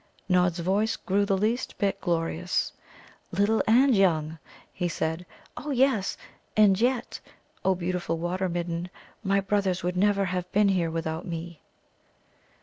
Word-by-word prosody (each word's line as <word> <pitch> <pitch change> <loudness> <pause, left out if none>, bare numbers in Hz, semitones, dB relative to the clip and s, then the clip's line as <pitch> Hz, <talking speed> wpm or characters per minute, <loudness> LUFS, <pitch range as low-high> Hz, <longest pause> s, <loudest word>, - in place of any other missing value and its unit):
Nod's 180 -2 +3
voice 200 +5 +1
grew 200 +2 0
the 195 -2 +2
least 225 +5 -1
bit 200 -2 -1
glorious. 170 0 -1 0.6
"'Little 210 +2 +2
and 250 +3 +5
young,'" 160 -5 +2 0.3
he 180 - -1
said. 160 +1 -3 0.3
"Oh 295 - -6
yes. 260 -7 +2 0.4
And 205 -1 +5
yet, 245 0 0 0.4
O 190 0 +3
beautiful 180 -1 -2
Water 180 +3 -1
midden, 170 0 -3 0.3
my 200 0 +2
brothers 195 -2 0
would 180 +1 -1
never 200 +1 +2
have 180 0 -3
been 205 0 +4
here 180 -4 +1
without 160 +1 -3
me." 170 -1 -6
185 Hz, 140 wpm, -27 LUFS, 175-205 Hz, 0.6 s, and